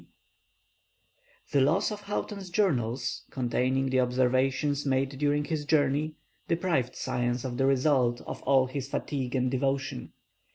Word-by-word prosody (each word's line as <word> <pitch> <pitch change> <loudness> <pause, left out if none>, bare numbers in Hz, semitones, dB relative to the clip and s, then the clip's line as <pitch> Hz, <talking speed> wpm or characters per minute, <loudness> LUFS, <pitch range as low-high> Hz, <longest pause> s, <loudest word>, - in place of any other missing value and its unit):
The 140 -3 +4
loss 170 +11 +2
of 210 -1 -5
Houghton's 200 -1 -4
journals, 130 - 0
containing 130 +1 0
the 130 - +3
observations 130 +3 +1
made 135 -1 +1
during 145 +2 0
his 155 -2 -2
journey, 145 +1 +1 0.3
deprived 165 -8 0
science 125 -1 -1
of 120 -2 -3
the 135 - +2
result 130 -3 +2
of - - -7
all 135 -1 +4
his 130 +1 -5
fatigue 135 -3 -3
and 130 -1 +1
devotion. 135 - -2
135 Hz, 130 wpm, -28 LUFS, 130-145 Hz, 0.3 s, The